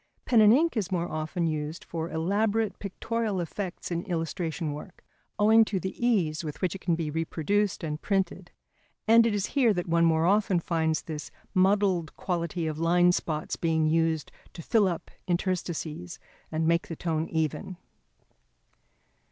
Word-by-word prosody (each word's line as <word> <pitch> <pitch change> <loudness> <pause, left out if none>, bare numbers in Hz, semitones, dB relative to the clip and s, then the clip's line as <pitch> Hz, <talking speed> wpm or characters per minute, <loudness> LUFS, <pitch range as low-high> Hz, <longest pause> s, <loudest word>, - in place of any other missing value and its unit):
Pen 235 -3 +5
and 210 0 +7
ink 315 +6 +3
is 200 -4 -1
more 175 -2 0
often 155 +2 -2
used 155 0 -3
for 165 0 -4
elaborate 205 +5 0
pictorial 215 +1 -2
effects 180 +1 -5
in 170 0 -1
illustration 165 -3 -2
work, 150 +5 -10 0.3
owing 220 +2 +6
to 205 -3 -2
the 190 +2 -4
ease 175 -10 +1
with 150 -2 -6
which 185 -3 0
it 195 - -8
can 170 - +1
be 160 -2 -3
reproduced 165 +6 -1
and 150 -1 -3
printed; 190 -2 -1 0.6
and 230 +1 +7
it 215 - 0
is 200 -1 0
here 245 -7 +4
that 175 - -2
one 170 0 +2
more 160 -1 +3
often 195 -1 +3
finds 160 -2 0
this 155 -2 -6 0.2
muddled 190 -3 +2
quality 170 -2 -2
of 155 -1 -3
line 175 +2 +4
spots 155 -3 -2
being 160 -2 +1
used 160 0 +1 0.2
to 165 - -9
fill 215 +1 +3
up 175 -2 -4 0.2
interstices 170 - -2 0.3
and 160 0 0
make 170 0 +2
the 165 - -5
tone 160 -1 -2
even. 160 +3 -2
175 Hz, 160 wpm, -28 LUFS, 160-200 Hz, 0.6 s, and